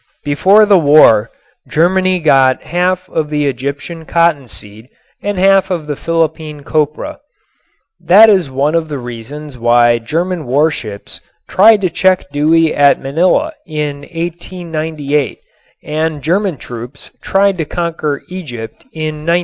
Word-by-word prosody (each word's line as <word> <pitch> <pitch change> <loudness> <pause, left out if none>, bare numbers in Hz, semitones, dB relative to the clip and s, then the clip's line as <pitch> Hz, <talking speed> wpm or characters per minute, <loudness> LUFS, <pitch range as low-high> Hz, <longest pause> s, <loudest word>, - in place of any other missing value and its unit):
Before 190 +9 +4
the 200 -3 +4
war 145 -8 +5 0.4
Germany 185 +3 +2
got 135 -5 +2
half 180 +1 -1
of 155 -4 -3
the 150 -1 -1
Egyptian 140 +5 -4
cottonseed 130 -10 -2 0.3
and 205 -1 -3
half 195 0 +3
of 170 -5 -3
the 150 -1 -4
Philippine 160 -2 -2
copra. 155 - -2 0.8
That 185 +6 +6
is 190 -9 +2
one 140 +4 0
of 165 -1 -1
the 145 - -4
reasons 125 +3 -9
why 120 0 +3
German 165 +5 -3
warships 130 -7 -2 0.3
tried 210 +2 +5
to 185 - 0
check 185 -4 +1
Dewey 155 +2 +2
at 145 -1 +4
Manila 180 - 0
in 150 -2 -3
1898 160 -2 -4 0.4
and 155 -1 -3
German 185 0 0
troops 120 +3 -10
tried 195 -1 +1
to 160 - -1
conquer 160 -3 -3
Egypt 140 -12 -8
in 155 -1 -4
1915. 170 +1 +3
155 Hz, 130 wpm, -14 LUFS, 140-180 Hz, 0.8 s, That